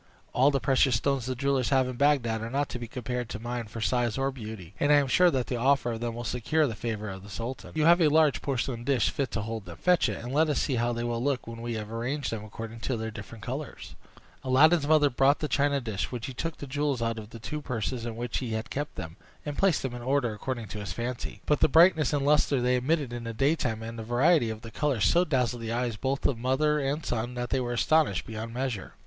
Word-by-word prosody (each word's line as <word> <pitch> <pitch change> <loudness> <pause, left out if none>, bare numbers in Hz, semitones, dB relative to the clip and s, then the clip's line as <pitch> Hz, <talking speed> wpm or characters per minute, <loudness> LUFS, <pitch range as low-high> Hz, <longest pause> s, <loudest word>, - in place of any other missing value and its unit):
All 130 +3 +5
the 140 -1 +1
precious 130 0 +3
stones 130 +2 0
the 130 - -2
jewellers 135 -1 +1
have 130 -2 +3
in 130 - -5
Bagdad 120 -5 +2
are 115 - -4
not 140 +3 -1
to 125 - -5
be 120 - -6
compared 125 0 -4
to 110 - -5
mine 120 +1 -4
for 115 +2 -7
size 120 0 +1
or 135 0 0
beauty; 110 -8 -8
and 145 - +3
I - - +8
am 145 -1 +4
sure 180 +7 +5
that 130 -6 0
the 125 - -3
offer 130 0 +2
of 115 - -4
them 120 -1 -3
will 120 - -5
secure 125 +7 +1
the 120 - -2
favor 110 -1 -4
of 95 -1 -6
the 100 - -12
sultan. 115 +6 -6
You 155 -1 +2
have 170 +2 +6
a 160 - +6
large 155 -1 +3
porcelain 130 -3 -2
dish 125 -3 +2
fit 140 -3 -2
to 110 - -3
hold 110 -1 -5
them; 85 -1 -9
fetch 180 -2 +3
it, - - -3
and 125 +2 -5
let 155 +2 +3
us 150 - +1
see 140 - 0
how 120 +1 +1
they 120 0 -3
will 120 0 -2
look, 140 -2 0
when 115 0 -8
we 120 -1 -3
have 105 0 -5
arranged 125 +5 -2
them 110 -2 -4
according 110 +1 -8
to 125 +2 -2
their 110 0 -4
different 115 -1 -10
colors." 135 +4 -6 0.5
Aladdin's 145 +4 +4
mother 150 -2 +4
brought 135 +4 +4
the 150 - -2
china 140 -1 +2
dish, 110 -6 -3
when 120 -3 -5
he 130 - -4
took 165 +5 -4
the - - -7
jewels 140 -2 -1
out 115 -1 -1
of 105 -1 -10
the 115 - -9
two 150 +7 -5
purses 125 -2 -3
in 115 -1 -4
which 120 0 -3
he 120 -4 -4
had 110 +1 -4
kept 145 +1 -3
them, 80 +3 -7 0.3
and 145 -1 -3
placed 190 -3 +2
them 130 -2 -3
in 120 - -6
order 130 -2 +1
according 115 +1 -4
to 105 - -6
his 105 -1 -5
fancy. 120 +1 -5
But 150 - +2
the - - +5
brightness 160 -3 +5
and 145 -2 0
lustre 145 -2 +3
they 125 +1 +2
emitted 140 0 0
in 120 -1 -5
the 115 - -4
daytime, 125 -3 0
and 115 +1 -6
the - - -4
variety 120 +3 +3
of 110 0 -5
the 115 -1 -9
colors, 135 -8 0
so 175 - +4
dazzled 125 -5 0
the 115 0 -4
eyes 120 -1 -1
both 135 +5 -2
of 125 -5 +1
mother 145 +5 +2
and 145 +3 -2
son 120 +1 -2
that 120 0 -4
they 135 - +2
were 120 -1 -2
astonished 145 - +2
beyond 110 +1 -6
measure. 120 -4 -4
125 Hz, 265 wpm, -28 LUFS, 115-140 Hz, 0.5 s, I